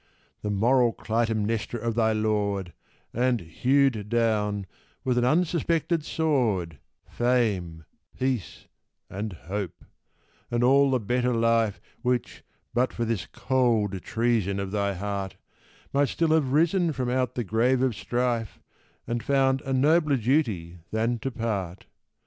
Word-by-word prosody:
The 105 - -3
moral 120 +4 +3
Clytemnestra 115 0 -1
of 115 +1 -1
thy 110 -1 +2
lord, 105 -4 -1 0.4
And 125 0 +1
hewed 125 - +1
down, 105 -3 +1 0.4
with 125 -1 +1
an 120 - +2
unsuspected 165 +1 +1
sword, 115 - 0 0.3
Fame, 100 -10 0 0.3
peace, 130 -5 -2 0.5
and 100 +1 -4
hope 95 +2 -6 0.6
and 120 0 0
all 140 +2 +5
the 130 -1 +2
better 125 +3 0
life 115 -2 +2 0.2
Which, 125 -1 -1 0.3
but 125 +2 +2
for 120 - -2
this 110 -5 -2
cold 115 -7 0
treason 110 -4 0
of 100 -1 -4
thy 100 -1 0
heart, 100 0 -4 0.6
Might 140 0 +3
still 165 -1 0
have 155 -5 +2
risen 165 +3 +2
from 125 -2 -2
out 130 -1 0
the 120 - -1
grave 120 +5 +2
of 130 -4 +1
strife, 115 +3 -2 0.5
And 120 0 -2
found 135 0 +2
a 135 - -5
nobler 150 +2 +3
duty 110 - 0
than 115 +2 0
to 135 - -2
part. 105 -7 -3
115 Hz, 130 wpm, -26 LUFS, 105-130 Hz, 0.6 s, all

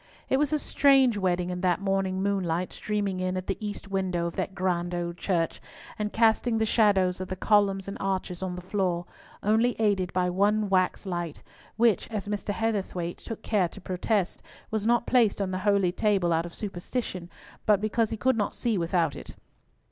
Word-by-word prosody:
It 265 - +3
was 295 0 +1
a 305 - +3
strange 270 -4 +4
wedding 180 -2 0
in 180 0 -4
that 180 -2 +2
morning 195 -1 0
moonlight 185 -3 -1
streaming 205 -3 -2
in 185 0 -1
at 185 - -4
the 195 - -2
east 205 -1 -5
window 185 -3 -1
of 170 - -4
that 195 - -3
grand 175 -1 -1
old 170 0 -3
church, 170 -4 -1 0.4
and 210 0 -1
casting 225 +1 +3
the 220 - +2
shadows 195 -5 +3
of 185 - -4
the 185 - -4
columns 195 -1 +2
and 195 - -5
arches 190 -2 -2
on 185 -1 -3
the 180 - -7
floor, 180 -3 -1 0.4
only 220 +4 +2
aided 200 -4 +1
by 180 -1 +1
one 205 +3 +2
wax 185 +1 +1
light, 175 -4 -4 0.3
which, 230 -3 +3
as 210 -3 -4
Mr. 205 0 -2
Heatherthwayte 200 -5 -2
took 225 - -8
care 200 -5 +2
to - - -11
protest, 190 +1 -1 0.3
was 220 0 -1
not 240 0 +3
placed 235 -6 +3
on 195 -2 -1
the 185 - -2
holy 200 -3 +3
table 190 -3 +1
out 165 +1 0
of 170 - -12
superstition, 190 -2 -4 0.4
but 210 -2 +5
because 215 +1 +1
he 225 - -3
could 260 +4 +2
not 205 - -1
see 230 -6 0
without 170 -3 +1
it. - - -9
195 Hz, 195 wpm, -27 LUFS, 180-215 Hz, 0.4 s, but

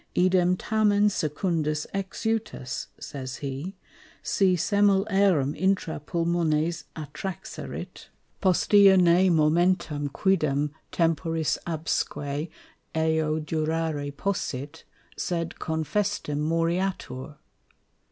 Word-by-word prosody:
_Idem 180 0 +3
tamen 210 -1 +3
secundis 155 -2 -1
exutus, 195 - -3
(says 130 -2 -6
he) 140 +7 -5 0.5
si 190 -2 +3
semel 200 +2 +3
aerem 185 -8 +3
intra 190 -3 0
Pulmones 165 0 0
attraxerit, 155 +5 -7 0.3
postea 195 +1 +5
ne 180 +1 +5
momentum 160 -2 +2
quidem 150 -4 +1 0.2
temporis 165 -1 0
absque 155 -2 -2 0.5
eo 160 -1 +1
durare 155 -1 -2
possit, 145 -8 -3 0.3
sed 170 -2 -2
confestim 160 0 -1
moriatur. 165 -4 -1
165 Hz, 80 wpm, -26 LUFS, 150-190 Hz, 0.5 s, postea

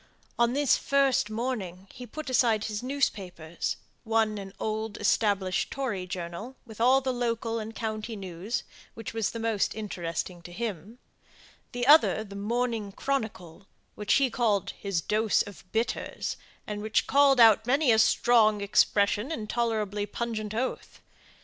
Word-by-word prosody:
On 235 0 +3
this 285 -2 +3
first 275 -6 +2
morning 215 -6 -4
he 250 - -9
put 310 +3 -7
aside 235 -4 +3
his 210 -1 -3
newspapers 190 - -2 0.3
one 220 -2 +1
an 195 -1 -8
old 220 0 -3
established 200 -3 +1
Tory 225 -10 -3
journal, 180 +7 -6
with 225 -2 -9
all 260 +3 +5
the 260 -1 -1
local 230 -1 -1
and 220 +1 -7
county 220 0 -4
news, 190 +3 -4 0.3
which 225 -1 -7
was 225 -2 0
the - - -6
most 225 -3 0
interesting 175 -4 -4
to 175 - -11
him; 210 +1 -5 0.7
the 245 0 -2
other 290 -6 +6
the 200 -2 -11
Morning 225 0 -1
Chronicle, 200 -8 -4 0.3
which 210 -1 +1
he 270 -3 +3
called 215 -6 +1
his 195 -4 -3
dose 215 +5 +2
of 195 -2 -13
bitters, 225 +2 -2 0.3
and 210 -1 -5
which 215 0 +1
called 275 -1 +4
out 220 -1 +6
many 275 0 +3
a 220 - +4
strong 220 -1 +4
expression 205 +4 +2
and 215 -9 -4
tolerably 215 -3 -1
pungent 215 -1 -4
oath. 255 +3 -3
220 Hz, 150 wpm, -28 LUFS, 200-240 Hz, 0.7 s, other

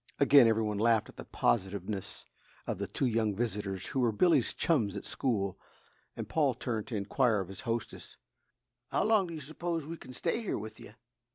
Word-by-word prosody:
Again 140 -3 +7
every 110 0 +2
one 105 -1 -1
laughed 115 -1 +3
at - - -15
the - - -8
positiveness 95 - -1 0.4
of - - -3
the - - -2
two - - -1
young 110 -4 +1
visitors 100 -4 -2
who 135 - -1
were 120 -3 +3
Billy's 170 +11 +3
chums 110 - +1
at - - -7
school, 100 -7 -1 0.6
and - - -5
Paul - - +2
turned 110 -3 -3
to 120 - -4
inquire 105 +2 +2
of 95 -2 -4
his 95 - -8
hostess: 115 -2 -4 0.7
"How - - +1
long 215 -3 +3
do 170 - -6
you 155 - -6
s'pose 160 +2 -3
we 165 +2 -6
can 130 - -11
stay 170 - -1
here 220 - -2
with 110 +1 -8
you?" 105 - -12
115 Hz, 195 wpm, -31 LUFS, 105-140 Hz, 0.7 s, Again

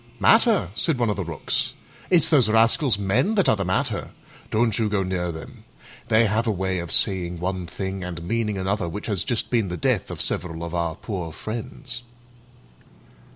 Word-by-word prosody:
"Matter?" - - +4
said 150 +5 0
one 120 -3 +1
of - - -1
the 95 - -2
Rooks; 85 -3 -2 0.3
"it's 175 -4 +4
those 130 -9 +5
rascals, 115 +3 +4
men, 110 - +1
that 195 -7 +3
are 135 - +5
the 100 - -2
matter. 95 0 -1 0.4
Don't 115 -1 +1
you 110 -2 +1
go 100 -2 +1
near 90 -2 -2
them. 80 -1 -10 0.4
They 110 +1 +4
have 110 +3 +1
a - - +3
way 95 -2 -1
of 85 -1 -4
saying 90 -3 +2
one 90 0 -3
thing 95 +1 -4
and 85 -2 -5
meaning 105 +1 -1
another 95 -1 -1
which 105 +5 -6
has 100 -6 0
just 120 - -1
been 115 -5 +2
the 90 0 -4
death - - 0
of - - -6
several 85 -2 -2
of 85 0 -5
our 85 -2 -1
poor 90 -7 -5
friends." 120 - -6
100 Hz, 190 wpm, -24 LUFS, 90-115 Hz, 0.4 s, those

